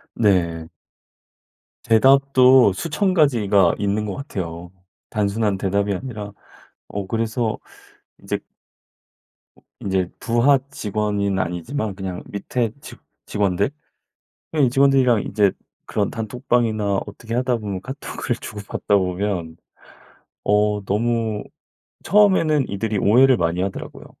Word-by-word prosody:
네. 85 -7 +1 1.2
대답도 130 -1 +5
수천 175 - -1
가지가 105 - +3
있는 105 +1 -1
것 100 -3 -4
같아요. 90 - -6 0.4
단순한 105 -1 0
대답이 100 +1 0
아니라. 105 -1 -6 0.6
어. 100 -1 -4
그래서 115 +1 -1 0.6
이제 - - -2 1.2
어 - - -23 0.2
인제 95 -2 -1
부하직원인 110 -6 0
아니지만 95 - -3
그냥 95 -2 -5
밑에 110 +3 -2
직 - - -11 0.3
직원들? 100 +2 0 0.8
그냥 150 -4 +3
이 - - 0
직원들이랑 130 -4 +4
이제 100 -3 +2 0.3
그런 105 -2 -1
단톡방이나 110 -3 0
어떻게 115 0 -7
하다 125 0 +1
보면 100 -4 -4
카톡을 135 -2 -4
주고받다 105 -1 -2
보면 90 -3 -2 0.9
어 105 0 +2
너무 110 +1 -1 0.6
처음에는 170 -8 +3
이들이 105 +2 -2
오해를 125 +6 +5
많이 85 0 0
하더라고요. 95 0 -5
105 Hz, 255 characters per minute, -21 LUFS, 100-125 Hz, 1.2 s, 대답도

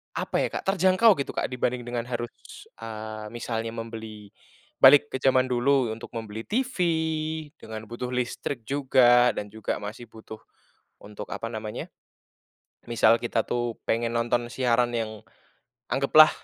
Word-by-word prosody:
apa - - -2
ya - - -3
Kak, - - -5
terjangkau 190 +1 +4
gitu 140 - -3
Kak - - -2
dibanding 125 -1 -1
dengan 120 -1 -4
harus, 120 -1 -3 0.5
eee, 110 -1 -7
misalnya 115 -1 -3
membeli 110 -2 -8 0.5
balik 145 +2 +7
ke - - -3
zaman 130 -1 +3
dulu 125 0 +2
untuk 110 +2 -8
membeli 110 -1 -6
TV 255 +4 -1 0.8
dengan 110 -1 -8
butuh 120 +3 -6
listrik 125 0 -3
juga, 125 -2 +4
dan 105 -1 -5
juga 110 0 -3
masih 105 +4 -7
butuh 110 -1 -11 0.6
untuk, 105 0 -8
apa 115 +3 -5
namanya, 110 -1 -6 1.0
misal 115 0 +4
kita 115 -2 0
tuh 120 -1 -2
pengen 115 +1 0
nonton 120 0 0
siaran 120 -1 +1
yang 110 -2 -4 0.7
anggaplah 155 +3 +6
120 Hz, 140 wpm, -26 LUFS, 110-130 Hz, 1.0 s, balik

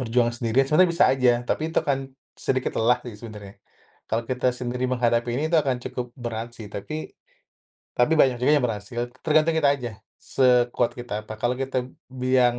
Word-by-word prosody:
berjuang 120 -1 +1
sendiri, 120 +3 +1
sebenarnya 170 +5 +4
bisa 170 - +4
aja. 130 -2 +4
Tapi 155 - -1
itu - - -14
akan 140 -2 +1 0.4
sedikit 130 -1 -1
lelah 125 +2 +3
sih 120 -4 -7
sebenarnya. 105 -3 -10 0.5
Kalau 115 +1 -1
kita 125 0 +1
sendiri 125 0 -3
menghadapi 120 -1 +1
ini, 145 - -1
itu - - +5
akan 130 -3 0
cukup 125 -1 -5
berat 120 -2 -5
sih. 110 -2 -9
Tapi 155 +11 -6 0.8
tapi 120 +6 +2
banyak 130 -4 +4
juga 130 - +4
yang 145 -4 +2
berhasil. 115 +2 -4 0.2
Tergantung 155 +1 +3
kita 150 -3 +4
aja, 120 -4 -5 0.3
sekuat 125 -2 +2
kita 115 -3 -4
apa. 110 - -8
Kalau 120 +3 0
kita 130 -1 -2 0.2
biang 125 -1 +2
125 Hz, 175 wpm, -24 LUFS, 120-130 Hz, 0.8 s, itu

